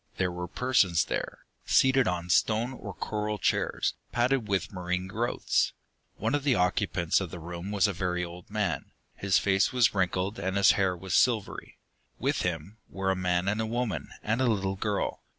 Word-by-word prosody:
There 90 -1 +1
were 90 0 -5
persons 95 -7 +2
there, - - -4 0.2
seated 130 -1 +4
on 90 -1 -1
stone 115 +7 +2
or 105 -5 -7
coral 105 +3 -3
chairs, - - 0 0.2
padded 120 -1 +1
with 100 0 -1
marine 90 0 -2
growths. 115 +6 0 0.4
One - - -1
of 145 -1 0
the 140 -3 +3
occupants 90 -1 +1
of 95 - -4
the 90 - -7
room 85 +3 -7
was 100 -3 +2
a 100 - -2
very 90 -1 -1
old 85 +1 -11
man; 105 -4 -2 0.2
his 95 -2 +2
face 95 0 +2
was 120 -2 +3
wrinkled, 95 +2 0
and 95 +1 -1
his 100 -1 +6
hair 95 -3 +1
was 95 +1 -5
silvery. 115 -5 +1 0.4
With - - 0
him 90 +4 -3
were 95 0 -1
a - - 0
man 90 0 0
and 105 +2 +1
a 110 - -2
woman, 110 - -2
and 115 +4 0
a - - +3
little 95 -4 0
girl. 100 +1 -2
95 Hz, 185 wpm, -28 LUFS, 90-110 Hz, 0.4 s, his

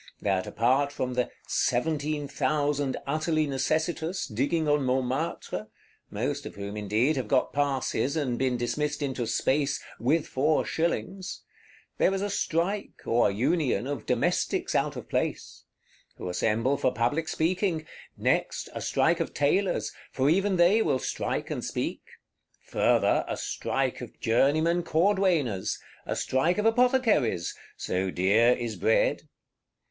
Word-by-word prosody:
That 95 -2 0
apart 130 +5 +2
from 125 -3 -3
the 125 0 0 0.2
"seventeen 145 +3 0
thousand 145 0 0
utterly 155 +2 +1
necessitous, 160 +5 -1
digging 145 +7 0
on 145 0 +3
Montmartre," 130 -2 -2 0.4
most - - -3
of - - -10
whom, 100 +1 -6
indeed, 105 +8 +1
have 125 -4 -2
got 130 +3 +1
passes, 140 -2 0
and 135 -6 -1
been 130 -2 +1
dismissed 145 +5 -2
into 130 -4 -2
Space 140 +4 +1 0.2
"with 145 +7 +2
four 150 +4 +1
shillings,"—there 185 +3 -3
is 195 - -2
a 205 - -2
strike, 195 +2 -1
or 120 +1 +3
union, 130 - +1
of 145 +1 -5
Domestics - - 0
out - - +1
of - - -7
place; - - -3 0.5
who 90 - -5
assemble 115 +9 +1
for - - +1
public 135 +8 0
speaking: 165 0 0 0.3
next, - - 0
a - - -5
strike 170 +1 +2
of 165 - -3
Tailors, 180 +6 +1 0.2
for 135 +3 +2
even 195 +3 +2
they 180 +5 +5
will 135 - +2
strike 125 - -3
and - - -3
speak; - - -3 0.6
further, - - +2
a - - -3
strike - - -2
of - - -10
Journeymen 155 +9 +2
Cordwainers; 170 - +1 0.3
a - - -1
strike 160 +8 +1
of 210 - 0
Apothecaries: 225 - +2 0.2
so 95 +1 -1
dear 105 +7 +4
is 120 -3 -3
bread. 110 +5 +1
145 Hz, 135 wpm, -27 LUFS, 120-165 Hz, 0.6 s, they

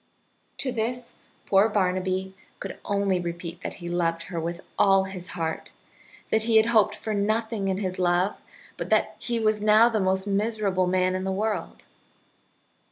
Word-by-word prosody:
To 265 - -1
this 240 +1 -3 0.3
poor 200 +3 +4
Barnaby 185 -1 0 0.3
could - - -7
only 200 -2 +1
repeat 170 0 -5
that - - -5
he 175 - -8
loved 165 -1 0
her 170 0 -5
with 170 +2 -4 0.2
all 195 -1 +5
his 190 -2 -6
heart, 160 -1 -3 0.6
that 220 - +3
he 230 -1 +2
had 220 - +6
hoped 225 -3 +3
for 220 - -4
nothing 215 0 0
in 190 -1 0
his 185 -2 -3
love, 180 +2 +1 0.4
but - - -5
that - - +2
he 235 -1 -1
was 215 -1 +1
now 215 +2 +6
the 220 -2 0
most 190 0 +1
miserable 200 -2 0
man 185 0 +2
in 185 0 -2
the 190 - -1
world. 210 +2 -3
195 Hz, 165 wpm, -26 LUFS, 185-215 Hz, 0.6 s, had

